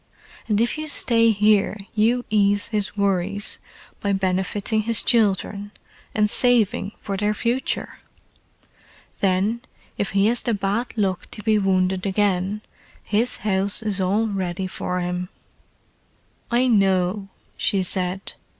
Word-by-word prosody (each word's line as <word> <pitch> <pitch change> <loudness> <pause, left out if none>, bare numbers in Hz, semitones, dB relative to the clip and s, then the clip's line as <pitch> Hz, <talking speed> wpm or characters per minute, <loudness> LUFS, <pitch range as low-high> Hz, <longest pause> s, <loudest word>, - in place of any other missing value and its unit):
And 210 -2 +1
if 235 +6 0
you 310 - -4
stay 230 -5 +4
here 210 -1 +3 0.2
you 235 +3 +2
ease 205 -1 +2
his 210 -2 -3
worries 200 0 0 0.4
by 200 -1 -1
benefiting 195 +3 0
his 230 +1 +3
children—and 210 -1 -1
saving 230 -2 +1
for 200 - -3
their 210 +2 0
future. 245 +5 -2 1.2
Then, 200 +4 +1 0.4
if 200 - -2
he 195 0 +3
has 235 +2 +2
the 235 -3 -1
bad 205 +5 -2
luck 190 -4 -1
to 210 - -8
be 215 -1 +3
wounded 185 -1 +1
again, 195 0 0 0.4
his 225 +4 +1
house 200 +2 0
is 205 -3 -1
all 200 +5 +1
ready 190 -3 -3
for 180 -1 -3
him." 180 0 -3 1.2
"I 245 +2 +2
know," 195 -2 +1 0.3
she 195 -2 0
said. 185 +1 -1
205 Hz, 125 wpm, -22 LUFS, 190-220 Hz, 1.2 s, stay